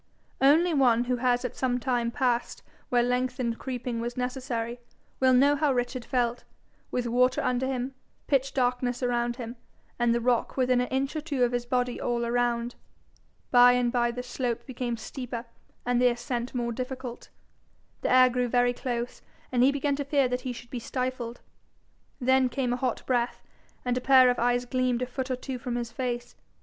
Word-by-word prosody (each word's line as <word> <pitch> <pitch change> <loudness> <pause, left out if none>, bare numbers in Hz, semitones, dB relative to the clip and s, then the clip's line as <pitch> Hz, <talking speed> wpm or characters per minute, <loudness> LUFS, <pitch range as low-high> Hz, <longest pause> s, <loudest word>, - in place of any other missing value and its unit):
Only 320 +6 +5
one 245 -5 +4
who 250 0 -1
has 245 0 +1
at 250 - -4
some 250 -1 0
time 240 -2 0
passed 245 -1 -1 0.3
where 245 -1 +3
lengthened 250 -1 -1
creeping 245 -2 -4
was 240 +1 -4
necessary, 250 -2 -3 0.4
will 260 0 +4
know 275 +3 +5
how 295 -1 +2
Richard 245 -1 -2
felt, 240 -1 0 0.5
with 250 -1 -1
water 250 +2 +2
under 250 +1 0
him, 260 0 -2 0.3
pitch 275 -1 +1
darkness 250 -1 0
about 240 -1 0
him, 240 -1 -7 0.4
and 240 -1 +3
the 235 - +2
rock 240 +1 0
within 255 -1 +3
an 250 - -1
inch 270 +3 -1
or 310 - -1
two 290 -5 -1
of 245 - +2
his 245 0 -2
body 250 -1 0
all 235 -1 -1
round. 240 0 0 0.8
By 245 0 +8
and 245 -1 +1
by 240 -1 +2
the 250 +1 -4
slope 245 -1 -3
became 245 -3 -3
steeper 245 +1 -6 0.4
and 245 0 +2
the 250 - +6
ascent 240 +1 -3
more 240 -1 -1
difficult. 255 0 -6 0.7
The - - 0
air 255 0 +7
grew 250 0 0
very 245 0 +2
close, 245 -1 -4 0.3
and 245 -1 +2
he 260 +2 +6
began 280 0 0
to 285 - -1
fear 280 -1 +2
he 250 +1 -2
should 240 0 -10
be 250 - -3
stifled. 250 -1 -4 0.8
Then 260 0 +3
came 245 -1 -1
a - - +1
hot 255 -1 -2
breath, 245 -2 0 0.4
and 250 0 +1
a 250 - -1
pair 260 -1 +6
of 245 - -3
eyes 245 +1 +2
gleamed 255 -1 0
a - - 0
foot 255 +1 -4
or 255 - 0
two 255 0 -6
from 245 -2 -3
his 240 -1 -3
face. 240 -1 -3
250 Hz, 185 wpm, -27 LUFS, 240-255 Hz, 0.8 s, By